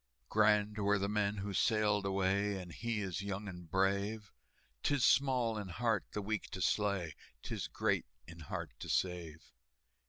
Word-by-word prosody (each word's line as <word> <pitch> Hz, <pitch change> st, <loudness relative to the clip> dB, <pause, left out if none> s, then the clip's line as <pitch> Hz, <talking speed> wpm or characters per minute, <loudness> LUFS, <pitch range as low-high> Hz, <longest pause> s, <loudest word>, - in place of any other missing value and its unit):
"Grand 105 Hz, 0 st, +3 dB
were 100 Hz, 0 st, +3 dB
the 100 Hz, 0 st, 0 dB
men 105 Hz, 0 st, 0 dB
who 100 Hz, 0 st, -3 dB
sailed 105 Hz, -1 st, +2 dB
away, 95 Hz, +1 st, +1 dB
And 90 Hz, -2 st, -8 dB
he 115 Hz, +3 st, -2 dB
is 95 Hz, -2 st, -3 dB
young 100 Hz, +1 st, -4 dB
and 90 Hz, -3 st, -8 dB
brave; 100 Hz, +3 st, 0 dB, 0.5 s
'Tis 145 Hz, -4 st, +2 dB
small 125 Hz, -5 st, +3 dB
in 100 Hz, -, -5 dB
heart 110 Hz, +3 st, 0 dB
the 105 Hz, -, -2 dB
weak 110 Hz, 0 st, -2 dB
to -, -, -4 dB
slay, 100 Hz, -5 st, +1 dB, 0.3 s
'Tis -, -, -3 dB
great -, -, 0 dB, 0.2 s
in 85 Hz, 0 st, -11 dB
heart 80 Hz, -, -5 dB
to -, -, -7 dB
save." 85 Hz, -4 st, -2 dB
100 Hz, 160 wpm, -35 LUFS, 95-105 Hz, 0.5 s, Grand